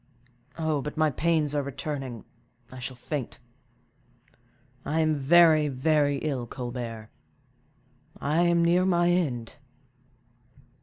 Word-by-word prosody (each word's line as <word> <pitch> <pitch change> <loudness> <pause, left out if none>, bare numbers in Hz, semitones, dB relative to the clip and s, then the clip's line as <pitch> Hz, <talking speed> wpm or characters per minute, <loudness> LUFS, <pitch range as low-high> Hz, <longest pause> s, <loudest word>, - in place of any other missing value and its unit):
But 155 -2 -2
my 155 -1 +3
pains 155 0 0
are 145 - +1
returning, 135 -4 -5 0.5
I 130 - -9
shall 125 +1 -5
faint. 130 +1 -5 1.5
I 155 +2 -1
am 155 -1 +2
very, 155 +1 +5
very 145 +1 +1
ill, 135 -6 -2
Colbert; 120 -3 -6 1.1
I 150 +4 +1
am 170 -1 +3
near 175 +2 +3
my 175 -2 +2
end!" 130 -10 -1
150 Hz, 105 wpm, -27 LUFS, 130-160 Hz, 1.5 s, very